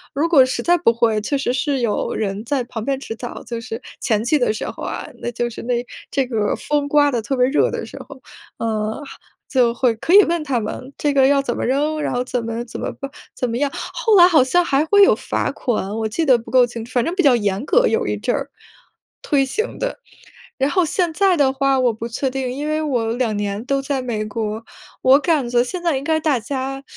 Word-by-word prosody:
如 295 Hz, +4 st, +1 dB
果 310 Hz, -6 st, +6 dB
实 255 Hz, -, -3 dB
在 350 Hz, -, +4 dB
不 315 Hz, -, +4 dB
会， 225 Hz, -2 st, +1 dB
确 280 Hz, +6 st, -1 dB
实 260 Hz, -2 st, -1 dB
是 275 Hz, +1 st, 0 dB
有 230 Hz, -3 st, -1 dB
人 205 Hz, -1 st, -3 dB
在 265 Hz, +1 st, 0 dB
旁 235 Hz, -2 st, -6 dB
边 270 Hz, 0 st, -1 dB
指 225 Hz, -, -6 dB
导， 240 Hz, +1 st, -7 dB
就 235 Hz, -1 st, -5 dB
是 225 Hz, 0 st, -6 dB, 0.2 s
前 220 Hz, -3 st, +1 dB
期 300 Hz, +5 st, +2 dB
的 245 Hz, -, +2 dB
时 220 Hz, -, -5 dB
候 -, -, -8 dB
啊， -, -, -4 dB
那 -, -, -2 dB
就 240 Hz, 0 st, -2 dB
是 235 Hz, -, -8 dB
那 245 Hz, +1 st, 0 dB, 0.3 s
这 270 Hz, -2 st, 0 dB
个 220 Hz, -4 st, -1 dB
风 290 Hz, -1 st, -1 dB
刮 290 Hz, 0 st, +4 dB
得 235 Hz, -2 st, -1 dB
特 270 Hz, +4 st, -3 dB
别 250 Hz, -, +4 dB
热 285 Hz, -, +2 dB
的 -, -, -4 dB
时 -, -, -11 dB
候。 275 Hz, -2 st, -12 dB, 0.4 s
呃， 215 Hz, -1 st, -1 dB, 0.5 s
就 245 Hz, -4 st, +3 dB
会 240 Hz, -1 st, +2 dB
可 320 Hz, +10 st, -1 dB
以 410 Hz, +1 st, +9 dB
问 340 Hz, -1 st, 0 dB
他 270 Hz, -5 st, 0 dB
们 255 Hz, +5 st, -6 dB
这 295 Hz, -, +1 dB
个 270 Hz, -1 st, +5 dB
要 280 Hz, 0 st, +3 dB
怎 245 Hz, -3 st, -2 dB
么 -, -, -2 dB
扔， 295 Hz, +4 st, 0 dB
然 -, -, -2 dB
后 245 Hz, 0 st, 0 dB
怎 250 Hz, -1 st, -3 dB
么 230 Hz, +1 st, -3 dB
怎 235 Hz, -, -8 dB
么 -, -, -3 dB
办 275 Hz, 0 st, -8 dB, 0.2 s
怎 250 Hz, -, -2 dB
么 230 Hz, -, -2 dB
样， 285 Hz, +2 st, +1 dB
后 455 Hz, -4 st, 0 dB
来 350 Hz, -, +9 dB
好 330 Hz, -6 st, +5 dB
像 350 Hz, +8 st, +2 dB
还 285 Hz, 0 st, +2 dB
会 405 Hz, +4 st, +6 dB
有 -, -, +6 dB
罚 -, -, -2 dB
款， 220 Hz, -6 st, -2 dB
我 220 Hz, -, -1 dB
记 325 Hz, +9 st, -1 dB
得 255 Hz, -4 st, +5 dB
不 230 Hz, -, -11 dB
够 255 Hz, -1 st, +6 dB
清， 230 Hz, -2 st, -7 dB
反 245 Hz, 0 st, 0 dB
正 335 Hz, -, -1 dB
比 370 Hz, -, +2 dB
较 270 Hz, -4 st, +6 dB
严 205 Hz, +1 st, -1 dB
格， -, -, +3 dB
有 455 Hz, 0 st, 0 dB
一 -, -, 0 dB
阵 -, -, -1 dB
儿， -, -, -4 dB, 0.7 s
推 280 Hz, -2 st, +2 dB
行 435 Hz, -, -3 dB
的。 -, -, -3 dB, 0.6 s
然 270 Hz, 0 st, +1 dB
后 365 Hz, +3 st, +2 dB
现 340 Hz, +1 st, -1 dB
在 375 Hz, 0 st, +3 dB
的 265 Hz, -2 st, +3 dB
话 275 Hz, 0 st, +1 dB
我 245 Hz, -2 st, +2 dB
不 225 Hz, +2 st, -6 dB
确 265 Hz, +4 st, -2 dB
定， 260 Hz, -1 st, -3 dB
因 285 Hz, +4 st, -4 dB
为 310 Hz, 0 st, 0 dB
我 240 Hz, -7 st, -1 dB
2 235 Hz, -3 st, -1 dB
年 205 Hz, +1 st, -3 dB
都 275 Hz, 0 st, 0 dB
在 270 Hz, -1 st, -2 dB
美 225 Hz, -4 st, -3 dB
国， 215 Hz, +1 st, -4 dB, 0.4 s
我 260 Hz, +1 st, +6 dB
感 300 Hz, -7 st, +1 dB
觉 240 Hz, 0 st, +3 dB
现 355 Hz, +8 st, -5 dB
在 335 Hz, -4 st, +1 dB
应 270 Hz, -, -5 dB
该 315 Hz, +1 st, +1 dB
大 305 Hz, -4 st, +1 dB
家 270 Hz, +3 st, -4 dB
260 Hz, 265 characters per minute, -20 LUFS, 235-295 Hz, 0.7 s, 以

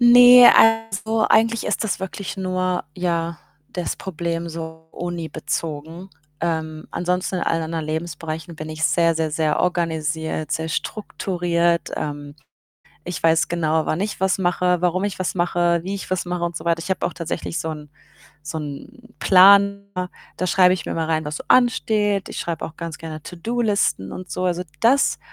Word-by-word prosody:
Ne, 245 Hz, +1 st, +9 dB
also, 225 Hz, 0 st, +3 dB
eigentlich 225 Hz, +1 st, +3 dB
ist 210 Hz, -, -1 dB
das 190 Hz, -2 st, -2 dB
wirklich 200 Hz, +1 st, -5 dB
nur, 185 Hz, -1 st, -1 dB
ja, 170 Hz, -2 st, -2 dB, 0.3 s
das 180 Hz, -2 st, -3 dB
Problem 170 Hz, -2 st, -4 dB
so 160 Hz, 0 st, -8 dB
unibezogen. 165 Hz, 0 st, -5 dB, 0.3 s
Ähm, 160 Hz, -2 st, -2 dB
ansonsten, 180 Hz, +1 st, -1 dB
in -, -, -3 dB
allen 165 Hz, 0 st, 0 dB
anderen 160 Hz, -1 st, -3 dB
Lebensbereichen, 160 Hz, +1 st, -5 dB
bin 155 Hz, -, -6 dB
ich 155 Hz, +1 st, -5 dB
sehr, 165 Hz, -1 st, +3 dB
sehr, 160 Hz, -1 st, -1 dB
sehr 155 Hz, -1 st, 0 dB
organisiert, 160 Hz, -3 st, -1 dB
sehr 160 Hz, 0 st, -1 dB
strukturiert. 175 Hz, -2 st, -1 dB
Ähm, 145 Hz, -1 st, -5 dB, 0.7 s
ich 180 Hz, +1 st, -5 dB
weiß 165 Hz, +3 st, +3 dB
genau, 160 Hz, -2 st, 0 dB
wann 155 Hz, -, -1 dB
ich 210 Hz, -, -3 dB
was 190 Hz, 0 st, +1 dB
mache, 180 Hz, -1 st, +1 dB
warum 180 Hz, +1 st, +1 dB
ich 205 Hz, -2 st, -3 dB
was 185 Hz, 0 st, -2 dB
mache, 175 Hz, -1 st, +1 dB
wie 190 Hz, +2 st, -4 dB
ich 195 Hz, -, -6 dB
was 185 Hz, -1 st, -1 dB
mache 175 Hz, -1 st, -3 dB
und 170 Hz, -2 st, -2 dB
so 160 Hz, -, -11 dB
weiter. 165 Hz, -1 st, +1 dB
Ich 180 Hz, -, -7 dB
habe 190 Hz, -, 0 dB
auch -, -, -2 dB
tatsächlich 170 Hz, 0 st, -4 dB
so 160 Hz, -, -3 dB
'n 150 Hz, -1 st, -7 dB, 0.5 s
so 155 Hz, +2 st, -5 dB
'n 225 Hz, -, -9 dB
Planer, 200 Hz, -1 st, +5 dB, 0.3 s
da 185 Hz, -, -1 dB
schreibe 180 Hz, 0 st, +5 dB
ich 180 Hz, -, -6 dB
mir -, -, -4 dB
immer 160 Hz, -1 st, -2 dB
rein, 160 Hz, -1 st, 0 dB
was 150 Hz, 0 st, -4 dB
so -, -, -8 dB
ansteht. 215 Hz, -5 st, +2 dB
Ich -, -, -6 dB
schreibe 170 Hz, -2 st, -3 dB
auch 160 Hz, -, -12 dB
ganz 165 Hz, -2 st, -6 dB
gerne 155 Hz, -1 st, -7 dB
To-do-Listen 200 Hz, -, -1 dB
und 185 Hz, -3 st, -8 dB
so. 180 Hz, +4 st, -3 dB
Also, 180 Hz, 0 st, 0 dB, 0.2 s
das 265 Hz, +4 st, +3 dB
175 Hz, 175 wpm, -22 LUFS, 160-190 Hz, 0.7 s, Ne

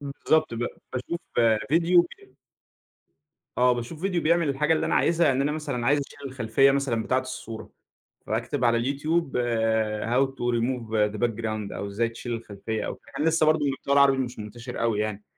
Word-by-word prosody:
بالضبط، 145 Hz, 0 st, 0 dB
ب 115 Hz, -, -5 dB, 0.3 s
باشوف 130 Hz, +7 st, -4 dB, 0.5 s
فيديو 170 Hz, +2 st, +5 dB
وك 385 Hz, -, -9 dB, 1.2 s
آه، 125 Hz, 0 st, +5 dB
باشوف 120 Hz, +7 st, -6 dB
فيديو 185 Hz, -3 st, 0 dB
بيعمل 165 Hz, -1 st, +2 dB
الحاجة 150 Hz, +4 st, +2 dB
اللي 155 Hz, -, 0 dB
أنا -, -, 0 dB
عايزها، 170 Hz, 0 st, +3 dB
يعني 135 Hz, 0 st, +2 dB
أنا 145 Hz, -, 0 dB
مثلًا 145 Hz, -6 st, -3 dB
عايز 145 Hz, +2 st, +4 dB
اشيل -, -, -16 dB
الخلفية 130 Hz, +2 st, +3 dB
مثلًا 135 Hz, -5 st, 0 dB
بتاعة 130 Hz, -, +1 dB
الصورة، 130 Hz, -3 st, -8 dB, 0.6 s
فأكتب 120 Hz, +5 st, -2 dB
على 115 Hz, 0 st, +4 dB
اليوتيوب، 145 Hz, +4 st, -1 dB, 0.7 s
how 125 Hz, +4 st, +2 dB
to 120 Hz, -2 st, -1 dB
remove 115 Hz, -4 st, 0 dB
the 105 Hz, -, -6 dB
background 110 Hz, -2 st, -4 dB
أو -, -, -4 dB
إزاي 105 Hz, +4 st, -1 dB
تشيل 120 Hz, +1 st, -6 dB
الخلفية 110 Hz, -1 st, -4 dB
أو -, -, -3 dB
كان 150 Hz, -, -6 dB
لسه 160 Hz, -1 st, +3 dB
برضه 155 Hz, -1 st, +3 dB
المحتوى 140 Hz, 0 st, -1 dB
العربي 140 Hz, -1 st, +5 dB
مش 125 Hz, -1 st, -3 dB
منتشر 115 Hz, +4 st, -7 dB
أوي 115 Hz, -3 st, +1 dB
يعني. 105 Hz, -1 st, -3 dB
130 Hz, 170 wpm, -26 LUFS, 115-150 Hz, 1.2 s, فيديو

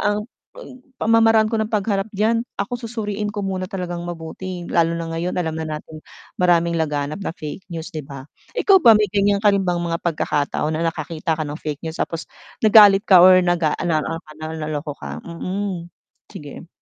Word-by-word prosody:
ang 210 Hz, +1 st, 0 dB, 0.3 s
ang 365 Hz, -, -12 dB, 0.2 s
pamamaraan 225 Hz, 0 st, +3 dB
ko 220 Hz, -, +1 dB
ng 215 Hz, -, -1 dB
pagharap 205 Hz, -1 st, -1 dB
diyan 225 Hz, +2 st, +2 dB, 0.2 s
ako 235 Hz, +5 st, -3 dB
susuriin 210 Hz, -2 st, -3 dB
ko 205 Hz, -1 st, -4 dB
muna 185 Hz, -1 st, -3 dB
talagang 180 Hz, -4 st, -4 dB
mabuti 175 Hz, +2 st, -6 dB
lalo 170 Hz, -1 st, +1 dB
na 165 Hz, -, -4 dB
ngayon 170 Hz, +2 st, -3 dB
alam 165 Hz, -3 st, -1 dB
na 160 Hz, 0 st, -4 dB
nating 155 Hz, 0 st, -11 dB, 0.4 s
maraming 170 Hz, -2 st, +3 dB
laganap 150 Hz, +3 st, -2 dB
na -, -, -3 dB
fake 155 Hz, +5 st, -8 dB
news, 170 Hz, +2 st, -7 dB
'di 155 Hz, -, -4 dB
ba? 140 Hz, -2 st, -10 dB, 0.3 s
Ikaw 390 Hz, -2 st, +5 dB
ba 230 Hz, -7 st, +7 dB
may 210 Hz, -, +3 dB
gan'yan 200 Hz, 0 st, +2 dB
ka 205 Hz, -, +6 dB
rin 200 Hz, -, +2 dB
bang 175 Hz, -, +1 dB
mga 165 Hz, 0 st, -2 dB
pagkakataon 150 Hz, -2 st, -1 dB
na 165 Hz, +1 st, 0 dB
nakakita 160 Hz, 0 st, -3 dB
ka 155 Hz, -, -2 dB
ng 150 Hz, +2 st, -6 dB
fake 150 Hz, 0 st, -5 dB
news 160 Hz, 0 st, -5 dB
tapos 165 Hz, -1 st, -3 dB, 0.4 s
nagalit 210 Hz, -1 st, +7 dB
ka 185 Hz, -4 st, +7 dB
or 185 Hz, 0 st, +7 dB
nag-a 175 Hz, -3 st, +1 dB
ano 165 Hz, -3 st, 0 dB
ano 165 Hz, +2 st, -4 dB
ka, 155 Hz, -, -14 dB
na -, -, -5 dB
naloko 150 Hz, -1 st, -4 dB
ka? -, -, -7 dB
Mm, 180 Hz, 0 st, -4 dB, 0.4 s
sige. 145 Hz, +3 st, -10 dB
175 Hz, 195 wpm, -21 LUFS, 160-205 Hz, 0.4 s, ba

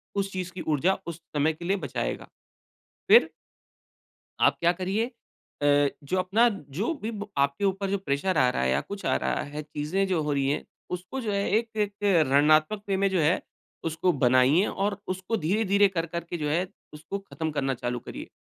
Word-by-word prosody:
उस 195 Hz, -1 st, -1 dB
चीज़ 185 Hz, -1 st, -4 dB
की 180 Hz, -, -6 dB
ऊर्जा 160 Hz, +5 st, +2 dB
उस 170 Hz, 0 st, -6 dB
समय 150 Hz, +2 st, +2 dB
के 170 Hz, +2 st, -9 dB
लिए 195 Hz, +3 st, +1 dB
बचाएगा। -, -, -3 dB, 0.8 s
फिर 475 Hz, -, +8 dB, 1.1 s
आप -, -, +4 dB
क्या 170 Hz, +1 st, +4 dB
करिए 195 Hz, +7 st, -1 dB, 0.5 s
अ, 145 Hz, 0 st, +4 dB, 0.2 s
जो 160 Hz, +7 st, -1 dB
अपना 210 Hz, +6 st, +4 dB, 0.3 s
जो 220 Hz, -, +1 dB
भी 220 Hz, -, -2 dB
ब 205 Hz, -2 st, -6 dB
आपके 140 Hz, +7 st, +1 dB
ऊपर 195 Hz, 0 st, 0 dB
जो 200 Hz, -, +1 dB
प्रेशर 185 Hz, +3 st, -1 dB
आ 130 Hz, -1 st, +5 dB
रहा 65 Hz, -, -1 dB
है 65 Hz, -, +2 dB
या -, -, +2 dB
कुछ 200 Hz, 0 st, -8 dB
आ -, -, +3 dB
रहा -, -, -1 dB
है, 150 Hz, +1 st, -6 dB
चीज़ें 155 Hz, +6 st, -1 dB
जो 175 Hz, -4 st, +1 dB
हो 150 Hz, -1 st, -1 dB
रही 135 Hz, -1 st, +1 dB
हैं, 145 Hz, -, -1 dB, 0.3 s
उसको 180 Hz, +9 st, -4 dB
जो 215 Hz, -4 st, -2 dB
है 200 Hz, -, +1 dB, 0.2 s
एक 230 Hz, 0 st, -4 dB
एक 210 Hz, -1 st, 0 dB, 0.4 s
रणनात्मक 155 Hz, +8 st, +4 dB
वे 195 Hz, -, +1 dB
में 195 Hz, +1 st, +2 dB
जो 185 Hz, -3 st, +1 dB
है, 155 Hz, +4 st, +3 dB, 0.4 s
उसको 165 Hz, +3 st, +1 dB
बनाइए 130 Hz, -, +5 dB
और 200 Hz, 0 st, -1 dB
उसको 190 Hz, +4 st, -2 dB
धीरे-धीरे 200 Hz, +3 st, +3 dB
कर-कर 170 Hz, -2 st, -3 dB
के 175 Hz, -, -2 dB
जो 150 Hz, -2 st, -2 dB
है, 175 Hz, +5 st, +1 dB, 0.3 s
उसको 155 Hz, +6 st, -6 dB
ख़त्म 160 Hz, -1 st, -3 dB
करना 135 Hz, -3 st, -1 dB
चालू 120 Hz, 0 st, -1 dB
करिए। -, -, -8 dB
180 Hz, 195 wpm, -27 LUFS, 150-200 Hz, 1.1 s, फिर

